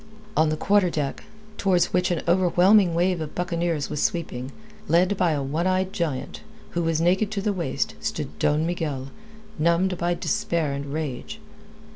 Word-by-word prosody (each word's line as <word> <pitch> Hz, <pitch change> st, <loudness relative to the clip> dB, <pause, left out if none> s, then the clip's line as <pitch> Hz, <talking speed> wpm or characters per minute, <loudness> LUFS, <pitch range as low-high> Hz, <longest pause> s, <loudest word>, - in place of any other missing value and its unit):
On 155 Hz, 0 st, +4 dB
the 155 Hz, -, -1 dB
quarter 200 Hz, +1 st, +3 dB
deck, 145 Hz, -4 st, -3 dB, 0.3 s
towards 185 Hz, -3 st, +2 dB
which 180 Hz, 0 st, +2 dB
an 175 Hz, -2 st, -1 dB
overwhelming 180 Hz, +1 st, +4 dB
wave 175 Hz, 0 st, +1 dB
of 155 Hz, -, -6 dB
buccaneers 170 Hz, -4 st, -1 dB
was 150 Hz, -, -2 dB
sweeping, 160 Hz, -, -2 dB, 0.4 s
led 180 Hz, +5 st, +3 dB
by 180 Hz, -4 st, +2 dB
a 145 Hz, -2 st, -1 dB
one 155 Hz, +6 st, -1 dB
eyed 185 Hz, 0 st, 0 dB
giant, 155 Hz, -7 st, -3 dB, 0.3 s
who 175 Hz, -, -1 dB
was 165 Hz, -1 st, +1 dB
naked 185 Hz, +5 st, +2 dB
to 205 Hz, -, -1 dB
the 205 Hz, +1 st, 0 dB
waist, 170 Hz, -8 st, -2 dB
stood -, -, -4 dB
Don 150 Hz, +2 st, +2 dB
Miguel, 150 Hz, -6 st, -3 dB, 0.5 s
numbed 170 Hz, +3 st, +2 dB
by 175 Hz, +1 st, +1 dB
despair 170 Hz, -8 st, -1 dB
and 140 Hz, +1 st, -4 dB
rage. 155 Hz, -, -4 dB
170 Hz, 165 wpm, -24 LUFS, 155-185 Hz, 0.5 s, On